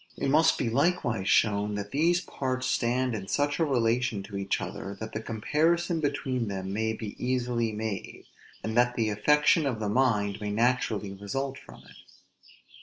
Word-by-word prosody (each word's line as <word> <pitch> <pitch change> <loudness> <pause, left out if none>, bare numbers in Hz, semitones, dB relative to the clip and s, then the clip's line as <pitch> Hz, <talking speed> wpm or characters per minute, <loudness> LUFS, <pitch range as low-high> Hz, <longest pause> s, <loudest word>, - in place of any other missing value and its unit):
It - - -1
must 155 +4 +4
be 125 - -1
likewise 120 - +1
shown, 105 -1 +2
that 100 0 -5
these 170 +5 +2
parts 130 -6 -3
stand 125 0 +1
in 100 -3 -5
such 145 - 0
a - - +4
relation 120 -5 +1
to 100 - -9
each 100 0 -1
other, 100 +1 -6
that 110 0 -6
the 110 - -3
comparison 160 - +1
between 135 -5 -1
them 95 -1 -4
may 110 +1 0
be 110 -2 -6
easily 125 -2 0
made, 105 -2 -5 0.4
and 110 0 -3
that 120 0 +3
the 110 -2 0
affection 150 - +3
of 120 -5 -2
the 105 -2 -2
mind 105 -4 +1
may 105 - -2
naturally 110 -2 0
result 130 +8 -4
from - - -14
it. - - -16
115 Hz, 175 wpm, -28 LUFS, 105-135 Hz, 0.4 s, must